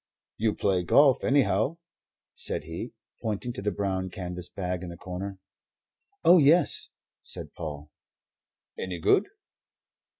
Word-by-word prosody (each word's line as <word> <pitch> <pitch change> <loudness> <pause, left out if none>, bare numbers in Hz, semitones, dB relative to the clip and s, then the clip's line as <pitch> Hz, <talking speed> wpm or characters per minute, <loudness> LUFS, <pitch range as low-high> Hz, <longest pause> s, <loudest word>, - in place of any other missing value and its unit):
"You 110 -1 +1
play 95 -3 +1
golf, 135 - +5
anyhow," 135 - +2 0.6
said - - -2
he, 80 +2 -6 0.3
pointing 110 +3 -2
to - - -6
the 105 - 0
brown 95 -1 -2
canvas 90 -1 -6
bag 90 -2 -3
in 90 - -6
the 85 - -8
corner. 95 +2 -6 0.9
"Oh, 180 +1 +8
yes," 145 -4 +4 0.3
said - - -6
Paul. 75 -1 -7 0.9
"Any 90 -2 -3
good?" 80 - +3
95 Hz, 125 wpm, -28 LUFS, 90-120 Hz, 0.9 s, Oh